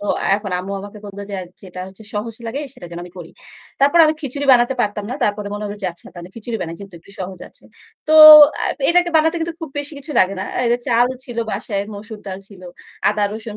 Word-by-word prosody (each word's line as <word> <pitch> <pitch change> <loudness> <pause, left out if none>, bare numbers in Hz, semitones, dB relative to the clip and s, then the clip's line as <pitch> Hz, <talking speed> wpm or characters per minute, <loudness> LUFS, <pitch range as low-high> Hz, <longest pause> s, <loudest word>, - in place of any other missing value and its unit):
তো 205 - -6 0.3
এখন 200 -1 -4
আম্মু 190 +2 -6
আমাকে 205 +2 -10
বলল 200 0 -10
যে 200 - -5 0.3
যেটা 185 -1 -9
হচ্ছে 190 +3 -15
সহজ 220 +2 -4
লাগে 265 +6 -4
সেটা 175 - -11
যেন 170 - -7
আমি 180 - -13
করি। 165 -1 -10 0.5
তারপর 285 +5 +4
আমি 310 0 +2
খিচুড়ি 280 0 -4
বানাতে 245 +1 +3
পারতাম 205 -2 -2
না। - - -3
তারপরে 205 0 -2
মনে 210 0 -5
হল 205 - -5
যে - - -1
আচ্ছা 170 - -17
তাহলে 175 0 -10
খিচুড়ি 230 0 -5
বানাই 165 -1 -5
যেহেতু 200 -2 -12
একটু 200 - -19
সহজ 185 -1 -6
আছে। - - -20 0.4
তো 310 - +2 0.5
আ - - +1 0.2
এটাকে 350 0 +3
বানাতে 320 +2 +3
কিন্তু 330 0 -3
খুব 320 -4 -7
বেশি 290 +2 -5
কিছু 295 +2 -8
লাগে 190 +1 +3
না। - - -3
অ্যা - - -1
এটা 240 +1 +2
চাল 240 +1 +4 0.2
ছিল 240 -2 -8
বাসায়, 200 0 -3
মসুর 210 +1 -9
ডাল 190 0 -5
ছিল, 190 -3 -15 0.5
আদা, 210 0 0
রসুন, 220 -1 -7
210 Hz, 230 wpm, -19 LUFS, 195-255 Hz, 0.5 s, তারপর